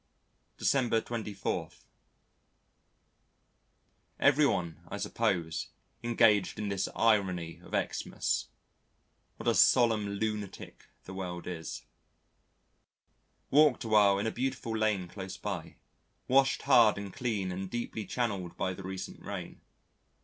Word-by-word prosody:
December 120 -5 +2
24. 110 -4 -3 2.5
Everyone 135 - +3
I - - -5
suppose 85 -4 -1 0.3
engaged 110 -4 +3
in 105 -1 -2
this 95 -1 -1
irony 95 -7 +1
of - - -14 0.2
Xmas. - - -2 0.9
What - - -6
a - - +5
solemn 110 -4 +4
lunatic 105 -1 -4 0.2
the 95 - -9
world 90 -2 -5
is. 85 -3 -6 1.7
Walked 150 -2 +5
awhile 105 -3 +5
in 100 - -1
a 110 - 0
beautiful 125 -3 -2
lane 105 -4 +1
close 95 0 -7
by, 90 -3 -5 0.5
washed 135 +1 +3
hard 120 -7 +6
and 100 -2 -6
clean 105 -7 -2
and 95 +1 -4
deeply 120 -1 -4
channelled 100 -4 -3
by 95 - -1
the 95 - -9
recent 95 0 -6
rain. - - -7
105 Hz, 110 wpm, -31 LUFS, 95-115 Hz, 2.5 s, hard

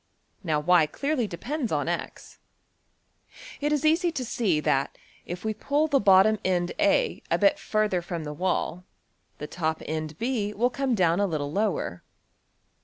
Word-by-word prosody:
Now 155 -4 0
$y$~clearly 180 - +2
depends 245 - -4
on~$x$. - - -3 1.2
It 295 +1 0
is 300 0 0
easy 335 +3 +3
to 260 -5 -3
see 205 -9 0
that, 135 -2 0 0.3
if 175 +4 -6
we 220 - 0
pull 285 +8 0
the 280 -2 +3
bottom 200 +1 +5
end~$A$ 190 - +1
a - - +2
bit 300 0 +3
further 215 -4 0
from 170 -1 -5
the 150 0 -5
wall, 180 +1 -2 0.5
the 150 - -6
top 160 0 -2
end~$B$ 205 - -3
will 245 +4 +1
come 270 -2 0
down 175 -2 +2
a 205 - +2
little 145 -4 -3
lower. 195 - -1
200 Hz, 145 wpm, -26 LUFS, 165-265 Hz, 1.2 s, bottom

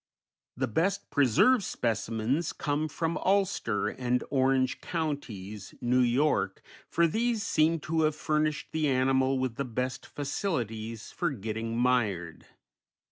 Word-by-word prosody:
The 130 +1 0
best 170 - 0
preserved 145 - +4
specimens 115 - -1
come 150 +2 -1
from 165 +2 -2
Ulster 190 - +1
and 125 -1 -1
Orange 130 -1 +2
Counties, 110 - -4
New 125 +1 +2
York, 125 -5 +2 0.3
for 170 - +3
these 225 +5 0
seem 165 -5 +2
to 160 0 0
have 155 -1 +2
furnished 155 -1 -1
the 155 -1 +1
animal 130 0 +2
with 130 -3 -2
the 140 - 0
best 125 +1 -3
facilities 115 - -3
for 175 - -1
getting 115 -2 -4
mired. 110 -10 0
130 Hz, 125 wpm, -29 LUFS, 115-155 Hz, 0.3 s, preserved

